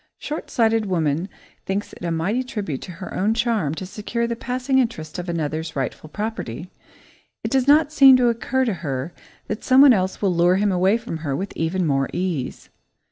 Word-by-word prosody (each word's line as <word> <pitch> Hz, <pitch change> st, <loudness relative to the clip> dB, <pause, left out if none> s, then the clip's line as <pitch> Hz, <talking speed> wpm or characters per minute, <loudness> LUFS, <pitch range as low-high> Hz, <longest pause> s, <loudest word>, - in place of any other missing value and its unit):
Short 300 Hz, +1 st, -6 dB
sighted 225 Hz, -2 st, +2 dB
woman 165 Hz, 0 st, 0 dB, 0.4 s
thinks 195 Hz, +2 st, -3 dB
it -, -, -12 dB
a 170 Hz, -, -1 dB
mighty 170 Hz, +9 st, 0 dB
tribute 210 Hz, -, -4 dB
to 180 Hz, -, -8 dB
her 185 Hz, +3 st, -8 dB
own 210 Hz, +4 st, +1 dB
charm 225 Hz, -, 0 dB
to 185 Hz, -, -6 dB
secure 215 Hz, +5 st, -3 dB
the 235 Hz, 0 st, -2 dB
passing 255 Hz, +3 st, 0 dB
interest 180 Hz, -, -2 dB
of 175 Hz, 0 st, -5 dB
another's 160 Hz, 0 st, -3 dB
rightful 135 Hz, +3 st, -4 dB
property. 185 Hz, -, -5 dB, 0.7 s
It -, -, -3 dB
does 265 Hz, -1 st, +2 dB
not 300 Hz, +1 st, +5 dB
seem 270 Hz, -4 st, +8 dB
to 250 Hz, -1 st, +3 dB
occur 235 Hz, +3 st, 0 dB
to 230 Hz, -, 0 dB
her 140 Hz, +1 st, -3 dB, 0.3 s
that 210 Hz, -, -5 dB
someone 265 Hz, +1 st, +7 dB
else 190 Hz, -2 st, -1 dB
will 195 Hz, -3 st, +1 dB
lure 175 Hz, +1 st, +4 dB
him 205 Hz, +1 st, +2 dB
away 190 Hz, +4 st, +3 dB
from 235 Hz, -8 st, -6 dB
her 150 Hz, -4 st, -3 dB
with 195 Hz, +7 st, -5 dB
even 175 Hz, +3 st, -1 dB
more 135 Hz, -3 st, +1 dB
ease. 175 Hz, -8 st, -3 dB
190 Hz, 190 wpm, -22 LUFS, 165-235 Hz, 0.7 s, seem